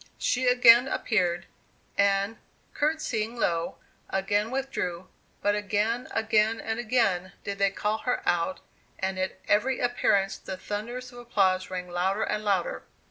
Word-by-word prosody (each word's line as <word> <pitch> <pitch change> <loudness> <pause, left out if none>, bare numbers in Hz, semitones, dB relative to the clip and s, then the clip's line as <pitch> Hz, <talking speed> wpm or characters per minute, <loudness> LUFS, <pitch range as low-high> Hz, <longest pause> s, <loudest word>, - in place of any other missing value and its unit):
She 255 +1 0
again 245 0 +7
appeared, 180 -9 0 0.5
and, 200 +2 +2 0.4
courtesying 245 -7 -1
low, 170 -6 0 0.3
again 205 +3 0
withdrew, 210 -10 -3 0.3
but 205 - +3
again, 210 +4 0
again, 220 0 +2
and 225 +1 -3
again 205 -6 +1
did 200 0 -4
they 200 0 +4
call 210 +2 -1
her 250 - -2
out 175 +1 +1 0.4
and 190 0 -2
at 185 0 -2
every 245 +5 +2
appearance 200 -5 +1
the 190 - -6
thunders 240 +6 -5
of 245 - -11
applause 190 -6 +1
rang 180 -1 -4
louder 185 +4 0
and 210 0 -2
louder. 185 - 0
205 Hz, 135 wpm, -27 LUFS, 190-240 Hz, 0.5 s, again